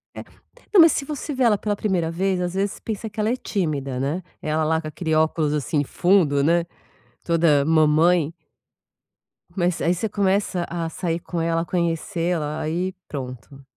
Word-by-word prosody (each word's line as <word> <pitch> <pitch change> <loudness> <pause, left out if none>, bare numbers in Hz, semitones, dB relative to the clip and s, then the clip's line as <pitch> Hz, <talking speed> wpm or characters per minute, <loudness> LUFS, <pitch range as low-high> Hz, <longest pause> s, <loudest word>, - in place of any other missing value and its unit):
É, - - -7 0.5
não, 380 - +9
mas 330 - +7
se 280 - -2
você 295 0 -5
vê 260 -1 0
ela 220 -3 +4
pela 205 +1 -2
primeira 185 -6 0
vez, 185 +2 0
às 180 0 -2
vezes 195 +1 -2
pensa 220 0 -5
que 205 - -10
ela 215 +1 +1
é 245 - +1
tímida, 145 - -2
né, 150 +7 -2 0.2
ela 155 +1 0
lá 160 +1 +1
com 155 - -7
aquele 160 +1 -3
óculos 155 -1 +1
assim 145 0 0
fundo, 155 -3 +2
né, 170 +2 +3 0.6
toda 165 -4 +3
mamãe. 160 +1 +3 1.2
Mas 180 -2 0
aí 170 - +2
você 215 +4 -2
começa 195 -3 0
a 170 -1 -3
sair 165 0 -2
com 170 0 -5
ela, 165 0 0
conhecê-la, 170 -2 -1
aí 175 +4 -2
pronto. 135 0 -8
170 Hz, 170 wpm, -23 LUFS, 155-190 Hz, 1.2 s, não